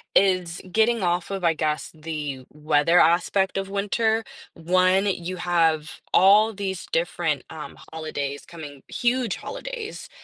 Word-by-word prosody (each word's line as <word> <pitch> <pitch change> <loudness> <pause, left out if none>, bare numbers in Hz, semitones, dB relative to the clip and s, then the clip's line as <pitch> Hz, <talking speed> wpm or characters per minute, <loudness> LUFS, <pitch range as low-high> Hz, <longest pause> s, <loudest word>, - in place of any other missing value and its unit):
is 185 -3 +3
getting 225 +4 +2
off 175 +1 0
of, 195 -2 -4
I 165 - +4
guess, 155 -1 -2
the 150 -4 -5
weather 150 +3 +3
aspect 185 +3 +3
of 195 0 -3
winter. 220 +3 0 0.3
One, 185 +3 +3
you 185 -2 -2
have 165 -3 0
all 205 +4 +6
these 190 -2 -4
different, - - 0
um, - - -9 0.2
holidays 145 -3 -4
coming 150 -5 -10
huge 245 -3 0
holidays 485 -3 -7
180 Hz, 130 wpm, -24 LUFS, 160-200 Hz, 0.3 s, all